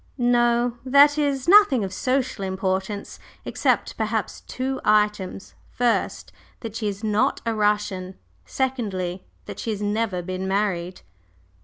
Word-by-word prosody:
"No; 240 Hz, -1 st, +2 dB
that 285 Hz, +3 st, +5 dB
is, 280 Hz, -2 st, 0 dB
nothing 360 Hz, -, +6 dB
of 190 Hz, -1 st, -4 dB
social 255 Hz, -2 st, -1 dB
importance, 190 Hz, +1 st, -3 dB, 0.3 s
except, -, -, 0 dB
perhaps, -, -, -2 dB
two 265 Hz, +1 st, -3 dB
items 210 Hz, -2 st, +1 dB, 0.2 s
first, 240 Hz, -2 st, -1 dB, 0.3 s
that 225 Hz, -2 st, -7 dB
she 220 Hz, -2 st, -2 dB
is 200 Hz, +1 st, -5 dB
not 215 Hz, +6 st, +1 dB
a 230 Hz, -, 0 dB
Russian; 210 Hz, -3 st, -1 dB, 0.3 s
secondly, 200 Hz, -9 st, -3 dB, 0.2 s
that -, -, -8 dB
she -, -, -4 dB
has 210 Hz, -2 st, -3 dB
never 205 Hz, -3 st, -1 dB
been 185 Hz, +1 st, -4 dB
married." 190 Hz, -3 st, -1 dB
215 Hz, 130 wpm, -23 LUFS, 190-250 Hz, 0.3 s, nothing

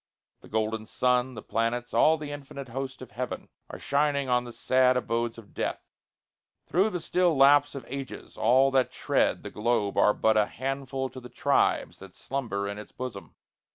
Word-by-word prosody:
The -, -, -16 dB
golden 110 Hz, 0 st, -1 dB
sun, 125 Hz, +1 st, +1 dB
The 110 Hz, -, -8 dB
planets, 120 Hz, +2 st, -1 dB
all 160 Hz, +1 st, +5 dB
the 150 Hz, -1 st, -6 dB
infinite 140 Hz, -2 st, -8 dB
host 130 Hz, +1 st, -5 dB
of 120 Hz, -, -12 dB
heaven, 125 Hz, +2 st, -5 dB, 0.2 s
Are -, -, -7 dB
shining 140 Hz, -1 st, 0 dB
on 125 Hz, 0 st, +2 dB
the 120 Hz, -, -8 dB
sad 130 Hz, +1 st, +3 dB
abodes 115 Hz, -1 st, -1 dB
of 110 Hz, -3 st, -14 dB
death, -, -, -3 dB, 0.8 s
Through 190 Hz, +5 st, +2 dB
the 180 Hz, -, -3 dB
still 175 Hz, -1 st, +1 dB
lapse 145 Hz, +1 st, +5 dB
of 135 Hz, -4 st, -7 dB
ages. 135 Hz, 0 st, -7 dB
All 130 Hz, +5 st, +4 dB
that 130 Hz, -2 st, +2 dB
tread -, -, 0 dB
The -, -, -7 dB
globe 105 Hz, -2 st, 0 dB
are 105 Hz, -, +5 dB
but 110 Hz, 0 st, +3 dB
a 105 Hz, -, +3 dB
handful 135 Hz, 0 st, -3 dB
to 130 Hz, -, -9 dB
the 125 Hz, -1 st, -11 dB
tribes 90 Hz, -5 st, +1 dB
That 95 Hz, -1 st, -13 dB
slumber 110 Hz, -8 st, -3 dB
in 100 Hz, +1 st, -5 dB
its 105 Hz, -, -10 dB
bosom. 125 Hz, -6 st, -7 dB
125 Hz, 185 wpm, -27 LUFS, 115-135 Hz, 0.8 s, all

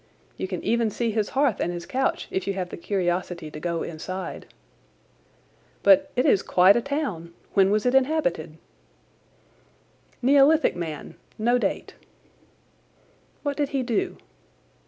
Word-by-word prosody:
You -, -, -4 dB
can 185 Hz, -2 st, -5 dB
even 235 Hz, -1 st, +1 dB
see 230 Hz, +2 st, -2 dB
his 215 Hz, -1 st, -1 dB
hearth 275 Hz, -6 st, +2 dB
and 175 Hz, -, -1 dB
his 175 Hz, -1 st, -6 dB
couch 265 Hz, +1 st, -1 dB
if 190 Hz, -, -2 dB
you 195 Hz, -, 0 dB
have 185 Hz, -2 st, -4 dB
the -, -, -6 dB
curiosity 175 Hz, -3 st, -2 dB
to 150 Hz, -, -8 dB
go 170 Hz, +1 st, -2 dB
inside. 185 Hz, +4 st, -6 dB, 1.4 s
"But 290 Hz, 0 st, +5 dB
it 250 Hz, -, +2 dB
is 195 Hz, -, +4 dB
quite 185 Hz, +2 st, +5 dB
a 240 Hz, -, +2 dB
town. 215 Hz, -, -4 dB, 0.2 s
When 195 Hz, -1 st, +4 dB
was 210 Hz, +2 st, +1 dB
it 250 Hz, -, +2 dB
inhabited?" 255 Hz, -, +1 dB, 1.6 s
"Neolithic 280 Hz, +5 st, +4 dB
man—no 175 Hz, +8 st, -3 dB
date." -, -, -2 dB, 1.5 s
"What 285 Hz, -1 st, -1 dB
did 290 Hz, -2 st, 0 dB
he 270 Hz, -2 st, -1 dB
do?" 245 Hz, -, -1 dB
205 Hz, 135 wpm, -25 LUFS, 175-265 Hz, 1.6 s, But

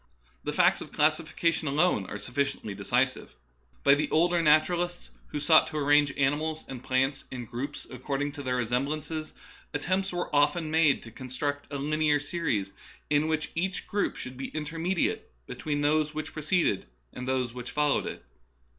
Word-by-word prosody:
The -, -, -2 dB
facts -, -, +3 dB
of -, -, -8 dB
classification 155 Hz, +1 st, +1 dB
alone 140 Hz, -, +2 dB
are -, -, -6 dB
suflBciently 125 Hz, -2 st, -2 dB
decisive. 125 Hz, -, 0 dB, 0.5 s
By 140 Hz, -, +7 dB
the 145 Hz, +2 st, +1 dB
older 175 Hz, +2 st, +3 dB
naturalists, 175 Hz, +3 st, +2 dB, 0.2 s
who 150 Hz, -, -4 dB
sought 155 Hz, +2 st, +6 dB
to 155 Hz, -, -5 dB
arrange 145 Hz, 0 st, +4 dB
animals 150 Hz, +3 st, 0 dB
and 130 Hz, -2 st, -7 dB
plants 135 Hz, +2 st, 0 dB
in 125 Hz, -2 st, -6 dB
groups 135 Hz, +6 st, -5 dB
according 135 Hz, +3 st, -3 dB
to 145 Hz, 0 st, -8 dB
their 130 Hz, -2 st, -1 dB
resemblances, 140 Hz, +6 st, -2 dB, 0.4 s
attempts 185 Hz, +6 st, 0 dB
were 175 Hz, -4 st, -3 dB
often 150 Hz, +2 st, +2 dB
made 160 Hz, -3 st, +3 dB
to 115 Hz, -, -10 dB
construct 140 Hz, +4 st, -4 dB
a 140 Hz, -, -2 dB
linear 150 Hz, +1 st, +2 dB
series 145 Hz, -, -2 dB, 0.4 s
in 150 Hz, +1 st, +3 dB
which 155 Hz, -1 st, -1 dB
each 185 Hz, +3 st, -2 dB
group 205 Hz, 0 st, -1 dB
should 130 Hz, 0 st, -7 dB
be 135 Hz, -, -4 dB
intermediate 165 Hz, +4 st, -2 dB
between 145 Hz, -, -3 dB
those 150 Hz, +1 st, +2 dB
which 155 Hz, 0 st, -4 dB
pre 155 Hz, -, -5 dB
ceded 155 Hz, -, +1 dB, 0.3 s
and 125 Hz, -, -6 dB
those 130 Hz, -2 st, 0 dB
which 125 Hz, -1 st, -6 dB
followed 150 Hz, -1 st, +1 dB
it. -, -, -7 dB
145 Hz, 165 wpm, -28 LUFS, 130-155 Hz, 0.5 s, By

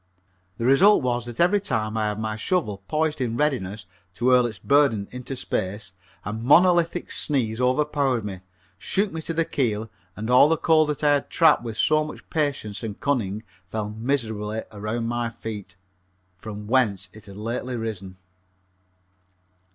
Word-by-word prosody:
The 115 Hz, -, -2 dB
result 160 Hz, +9 st, +6 dB
was 120 Hz, -1 st, -1 dB
that 120 Hz, -1 st, -8 dB
every 180 Hz, +4 st, +4 dB
time 110 Hz, -, -2 dB
I 110 Hz, -1 st, 0 dB
had 105 Hz, 0 st, -2 dB
my 110 Hz, -1 st, -2 dB
shovel 110 Hz, -, -1 dB
poised 155 Hz, -2 st, 0 dB
in 120 Hz, -2 st, -1 dB
readiness 105 Hz, -9 st, -1 dB, 0.3 s
to 120 Hz, +6 st, +1 dB
hurl 125 Hz, -1 st, +5 dB
its 110 Hz, -3 st, -7 dB
burden 135 Hz, -2 st, +2 dB
into 125 Hz, +2 st, -6 dB
space 95 Hz, -4 st, -3 dB, 0.3 s
a 105 Hz, -, -3 dB
monolithic 170 Hz, +9 st, +3 dB
sneeze 125 Hz, -5 st, -1 dB
overpowered 135 Hz, -2 st, +1 dB
me, 95 Hz, -3 st, -6 dB, 0.4 s
shook 200 Hz, -, 0 dB
me 160 Hz, -, -5 dB
to 165 Hz, -, -4 dB
the 165 Hz, 0 st, +2 dB
keel, 110 Hz, -6 st, -1 dB, 0.2 s
and 110 Hz, +1 st, -5 dB
all 130 Hz, +4 st, +7 dB
the 165 Hz, -, +2 dB
coal 155 Hz, -1 st, +4 dB
that 150 Hz, 0 st, -3 dB
I 145 Hz, -1 st, +5 dB
had 145 Hz, -, 0 dB
trapped 160 Hz, -6 st, +4 dB
with 115 Hz, -2 st, -6 dB
so 155 Hz, 0 st, +3 dB
much 150 Hz, -, -9 dB
patience 140 Hz, -10 st, -1 dB
and 110 Hz, -3 st, -6 dB
cunning 110 Hz, -7 st, -1 dB, 0.2 s
fell 105 Hz, +2 st, -4 dB
miserably 110 Hz, -2 st, -2 dB
around 110 Hz, +2 st, -3 dB
my 120 Hz, 0 st, -1 dB
feet, 105 Hz, -4 st, -7 dB, 0.6 s
from 105 Hz, +2 st, -8 dB
whence 105 Hz, -5 st, +1 dB
it 110 Hz, -1 st, -14 dB
had 100 Hz, 0 st, -11 dB
lately 120 Hz, +4 st, -3 dB
risen. 100 Hz, -5 st, -5 dB
120 Hz, 165 wpm, -24 LUFS, 105-145 Hz, 0.6 s, all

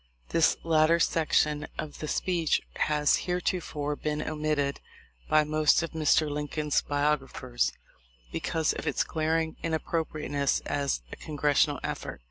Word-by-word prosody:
This 165 Hz, -2 st, +3 dB
latter 165 Hz, +1 st, +4 dB
section 155 Hz, -2 st, +2 dB
of 155 Hz, -1 st, -6 dB
the 155 Hz, -, -4 dB
speech 170 Hz, -1 st, +1 dB, 0.2 s
has 150 Hz, -1 st, +3 dB
hereto 180 Hz, +1 st, 0 dB
fore 150 Hz, -3 st, -3 dB
been 150 Hz, 0 st, -2 dB
omitted 150 Hz, -2 st, -1 dB, 0.5 s
by 155 Hz, 0 st, +5 dB
most 155 Hz, +2 st, +3 dB
of 165 Hz, -, -4 dB
Mr. 155 Hz, -1 st, +3 dB
Lincoln's 150 Hz, 0 st, -1 dB
biog 145 Hz, +1 st, +1 dB
raphers 125 Hz, -2 st, -2 dB, 0.6 s
because 160 Hz, -1 st, 0 dB
of -, -, -6 dB
its 150 Hz, -, +1 dB
glaring 160 Hz, 0 st, -1 dB
inappropriateness 155 Hz, -3 st, -1 dB
as 140 Hz, -, -1 dB
a -, -, -6 dB
Congressional 145 Hz, -1 st, +1 dB
effort. -, -, -4 dB
150 Hz, 130 wpm, -28 LUFS, 145-160 Hz, 0.6 s, by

